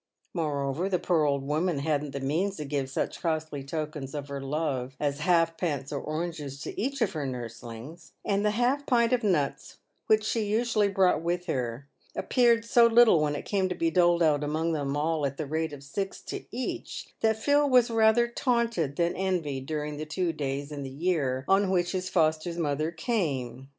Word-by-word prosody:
Moreover, 150 +1 -1
the 185 - +2
poor 170 -4 +2
old 140 -1 +1
woman 155 +3 0
hadn't 150 0 -1
the 140 - -5
means 165 +9 -1
to 150 - -4
give 140 -2 -2
such 135 - -3
costly 155 -4 -2
tokens 150 -1 -5
of 145 -1 -5
her 140 -1 -4
love 135 -3 -2
as 145 -1 -1
halfpence 165 -4 +1
or 140 - -2
oranges 155 -3 -4
to - - -5
each 270 +3 -2
of 215 - 0
her 155 -3 -3
nurslings; 120 +5 -8
and 200 0 +1
the 210 - +3
half 265 +4 +1
pint 235 -1 +3
of 245 -2 +1
nuts, 160 -9 0 0.3
which 215 0 +4
she 220 +2 0
usually 215 0 +2
brought 190 -4 +3
with 175 +1 -1
her, 130 -4 -3 0.3
appeared 235 -2 +3
so 235 0 +6
little 230 -7 +6
when 150 -1 0
it - - -5
came 190 -2 0
to 180 - -2
be 165 -1 0
doled 175 -1 +4
out 150 -2 +3
among 160 +3 0
them 145 -2 -1
all 155 0 0
at 140 0 -1
the 155 - -3
rate 160 +2 -2
of 145 -1 -9
six 195 +8 -4
to - - -6
each, 250 +2 -5
that 220 -1 +2
Phil 285 +5 +3
was 250 -2 +5
rather 225 +1 +4
taunted 235 - 0
than 170 +1 +1
envied 160 -8 -2
during 150 -1 -3
the 155 - -4
two 165 +2 -1
days 140 -1 -3
in 145 -1 -5
the 135 - -5
year 140 -3 -1
on 195 0 +3
which 180 -2 +1
his 185 -1 -2
foster 160 0 +1
mother 155 0 0
came. 140 - -2
160 Hz, 195 wpm, -28 LUFS, 140-195 Hz, 0.3 s, so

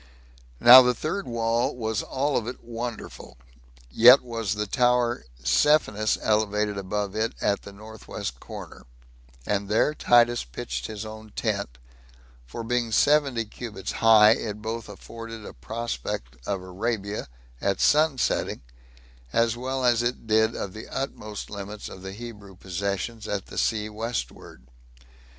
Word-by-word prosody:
Now 125 +2 +11
the 125 -1 +2
third 160 - -3
wall 115 0 0
was 110 -3 -2
all 140 +1 -1
of 115 - -1
it 125 - -7
wonderful; 115 - -7 0.5
yet 125 - +8
was 115 -4 -3
the 105 0 -2
tower 120 - +1 0.2
Psephinus 110 - +3
elevated 105 -1 +1
above 100 +1 -3
it 115 +2 -1
at 100 -1 0
the 100 - -10
north 110 +2 -13
west - - -5
corner, - - -10 0.6
and 100 -1 -1
there 110 +8 +2
Titus 120 -4 +4
pitched - - -5
his 110 0 -6
own 110 0 -10
tent; - - -2 0.7
for 115 - -6
being 120 0 -1
seventy 140 -3 +3
cubits 105 -3 -6
high 110 -1 +6
it 105 -2 -1
both 110 +1 -5
afforded 115 -2 -9
a - - -9
prospect 65 - -5
of 95 -2 -2
Arabia 100 +1 -3 0.3
at 100 - 0
sun 155 +1 +4
rising, 130 - -1 0.7
as 115 +4 +2
well 130 +1 -2
as 120 -1 +4
it 120 0 -2
did 110 +1 +2
of 95 - -5
the 110 - -9
utmost 110 -6 -5
limits 100 0 -7
of 95 - -10
the 95 0 -7
Hebrew 105 -3 -10
possessions 100 +5 -4
at 100 -2 -3
the - - -11
sea 105 -2 0
westward. 110 - -6
110 Hz, 145 wpm, -25 LUFS, 100-120 Hz, 0.7 s, Now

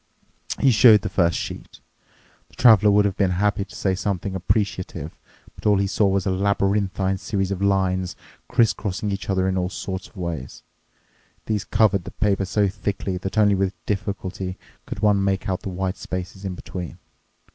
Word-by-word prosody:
He 135 - +5
showed 110 -2 +7
the - - -3
first 85 -2 +2
sheet. - - -7 0.7
The - - -21
Traveler 110 -3 +6
would 105 0 +4
have 100 -2 0
been 100 -3 +2
happy 100 0 +1
to - - -14
say 95 - 0
something 95 0 -2
appreciative, 95 -5 -2 0.4
but - - -4
all 105 -1 +5
he 100 - +1
saw 100 +1 +2
was 95 -1 +1
a 95 - +1
labyrinthine 100 0 0
series 95 0 -2
of 95 -1 -3
lines, 95 -3 +1 0.3
criss 120 -3 +3
crossing 100 +1 -3
each 100 -1 -4
other 95 -1 +1
in 95 0 0
all 90 0 -1
sort 95 0 -5
of - - -20
ways. 85 -7 -5 0.8
These 105 -2 -1
covered 105 -5 +2
the - - -7
paper 100 -2 +1
so 100 +2 +1
thickly 95 -1 -3
that 95 +3 -5
only 105 -1 +5
with 95 -1 0
difficulty 95 -2 -3 0.3
could - - -6
one 105 -2 +3
make 95 -1 0
out 95 -1 -1
the - - -5
white 95 +1 -3
spaces 95 +2 -6
in 95 -1 -3
between. 90 -2 -7
95 Hz, 180 wpm, -23 LUFS, 95-100 Hz, 0.8 s, showed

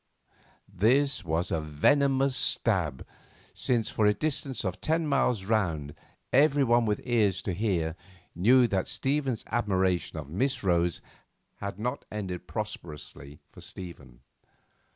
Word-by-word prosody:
This 120 +7 +2
was 85 +1 -1
a 80 - 0
venomous 135 - +2
stab, 90 - 0 0.5
since 115 -4 0
for 105 - +2
a 105 - +3
distance 135 -3 -2
of 95 - -3
ten 160 +1 +1
miles 125 -8 +1
round 85 -10 0 0.4
everyone 135 -4 +4
with 105 -1 0
ears 105 -6 +2
to 95 - -2
hear 85 -5 -1 0.4
knew 120 +9 +5
that 95 -5 0
Stephen's 135 -4 -1
admiration 95 -7 0
of 75 -3 -6
Miss 125 - -1
Rose 85 -2 +1 0.5
had 100 -2 -5
not 125 +6 -3
ended 95 -4 -5
prosperously 75 -8 -7
for - - -13
Stephen. 70 -10 -10
105 Hz, 125 wpm, -28 LUFS, 85-125 Hz, 0.5 s, knew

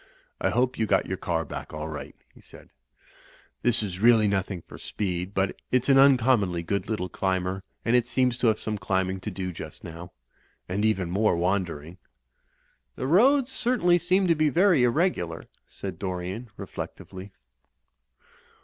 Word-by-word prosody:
"I - - +1
hope 125 +2 0
you 110 - +1
got - - +3
back - - -12
your 95 - -2
car 80 -3 -2 0.3
all 75 0 -4
right," 75 -2 -7 0.2
he - - -18
said - - -15 0.9
"This 120 -2 +2
is 95 -3 -5
really 110 -1 +5
nothing 95 -3 -2
for - - -13
speed; 90 -1 -4
but 95 0 -1
it's 130 +1 +1
an 135 -1 +6
uncommonly 120 -10 +4
good 100 +4 -2
little 105 -5 -2
climber, 95 +1 -2 0.2
and 115 - +3
it 120 -1 +3
seems 125 -1 +1
to 120 - +2
have 110 -1 +3
some 105 -1 -3
climbing 95 -1 -1
to 105 - -5
do 95 -2 -4
just 80 -2 -9
now. 85 +1 -9 0.6
And 95 +3 -2
even 95 -5 +1
more 100 -1 +2
wan 95 +2 +1
dering." 80 +2 -9 1.0
"The - - -4
roads 255 - +4
certainly 230 -10 +2
seem 185 +3 +2
to 170 - +4
be 155 -1 +2
very 175 -1 +4
irregular/' 120 - 0 0.2
said - - -7
Dorian, 95 +5 -4
reflectively. 95 +2 -8
100 Hz, 165 wpm, -26 LUFS, 90-125 Hz, 1.0 s, an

